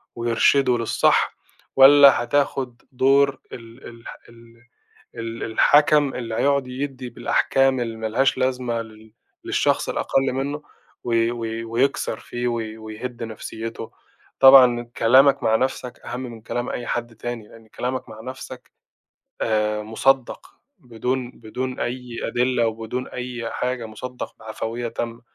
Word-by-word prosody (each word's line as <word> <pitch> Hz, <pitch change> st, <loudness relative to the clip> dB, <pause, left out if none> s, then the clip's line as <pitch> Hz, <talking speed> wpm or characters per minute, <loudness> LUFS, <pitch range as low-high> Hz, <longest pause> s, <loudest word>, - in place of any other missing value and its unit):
ويرشِده 120 Hz, +2 st, +2 dB
للصح، 115 Hz, -1 st, +1 dB, 0.4 s
والّا 135 Hz, -1 st, +8 dB
هتاخد 130 Hz, -2 st, -1 dB
دور 135 Hz, +1 st, +3 dB
ال 115 Hz, +2 st, -11 dB
ال 115 Hz, -1 st, -12 dB
الح -, -, -10 dB, 1.0 s
ال 115 Hz, 0 st, -5 dB
الحَكَم 145 Hz, +4 st, +4 dB
اللي 115 Hz, -3 st, -4 dB
هيقعد 140 Hz, 0 st, +1 dB
يدِّي 130 Hz, -1 st, -5 dB
بالأحكام 135 Hz, +2 st, +1 dB
اللي 115 Hz, -2 st, -3 dB
ما 110 Hz, 0 st, -3 dB
لهاش 130 Hz, +4 st, +1 dB
لازمة 125 Hz, -2 st, -1 dB
لل 110 Hz, -1 st, -14 dB, 0.3 s
للشخص -, -, +1 dB
الأقل 135 Hz, -1 st, 0 dB
منَّه، 140 Hz, +3 st, -3 dB, 0.4 s
وي 115 Hz, -1 st, +1 dB
وي 115 Hz, -1 st, -4 dB
ويكسر 120 Hz, +5 st, -1 dB
فيه، 120 Hz, 0 st, -4 dB
وي- 115 Hz, -2 st, -3 dB
ويهُد 110 Hz, +2 st, -7 dB
نَفْسيَّته. 115 Hz, 0 st, -7 dB, 0.5 s
طبعًا 130 Hz, -3 st, +8 dB
كلامك 135 Hz, +4 st, +5 dB
مع 110 Hz, -, +3 dB
نَفْسك 130 Hz, 0 st, -2 dB
أهم 125 Hz, -, -6 dB
من 115 Hz, -3 st, -8 dB
كلام 120 Hz, +2 st, -4 dB
أي 120 Hz, -, -5 dB
حد 120 Hz, -1 st, -3 dB
تاني، 115 Hz, -1 st, -6 dB
لأن 115 Hz, -1 st, -17 dB
كلامك 125 Hz, +2 st, -4 dB
مع 110 Hz, 0 st, -10 dB
نَفْسك، 130 Hz, +2 st, -9 dB, 0.7 s
آآ، 105 Hz, -1 st, 0 dB
مُصدَّق، 130 Hz, +4 st, 0 dB, 0.3 s
بدون 125 Hz, +1 st, -3 dB
بدون 125 Hz, +2 st, -6 dB
أي 125 Hz, -1 st, -4 dB
أدلة، 125 Hz, -1 st, +1 dB
وبدون 115 Hz, +3 st, -4 dB
أي 125 Hz, -2 st, -5 dB
حاجة، 125 Hz, -2 st, -3 dB
مُصدَّق 125 Hz, +3 st, -7 dB
بعفوية 115 Hz, +2 st, -5 dB
تامة. 115 Hz, +1 st, -5 dB
120 Hz, 130 wpm, -22 LUFS, 115-130 Hz, 1.0 s, والّا